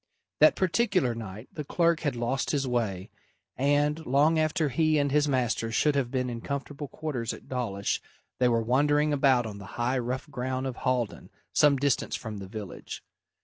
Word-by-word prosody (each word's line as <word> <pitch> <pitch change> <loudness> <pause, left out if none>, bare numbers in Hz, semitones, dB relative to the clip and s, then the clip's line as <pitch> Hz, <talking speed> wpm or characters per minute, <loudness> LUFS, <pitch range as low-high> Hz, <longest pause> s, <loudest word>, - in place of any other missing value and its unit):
That 155 - +7
particular 185 - +1
night 110 0 -8
the 150 - -4
clerk 170 +2 +2
had 145 -6 -1
lost 120 +3 -1
his 140 -3 0
way, 105 -7 -2 0.4
and, 145 +3 +1
long 150 +4 +3
after 155 0 +1
he 155 +3 +2
and 145 -1 +1
his 150 +1 +3
master 120 -4 0
should 150 +6 +2
have 140 -4 0
been 125 0 -1
in 120 -1 -5
comfortable 140 +2 -5
quarters 135 -6 -4
at - - -12
Dawlish, 110 -6 -2 0.4
they 125 - +4
were 115 -1 +2
wandering 145 +5 +2
about 135 -4 +3
on 105 -2 -6
the 100 - -10
high 125 +2 +1
rough 125 +3 -3
ground 130 0 -2
of 130 -2 -4
Haldon, 125 -4 -1 0.2
some 145 -2 +5
distance 140 -1 0
from 110 -2 -6
the 100 -1 -7
village. 105 -1 -7
130 Hz, 180 wpm, -28 LUFS, 120-150 Hz, 0.4 s, That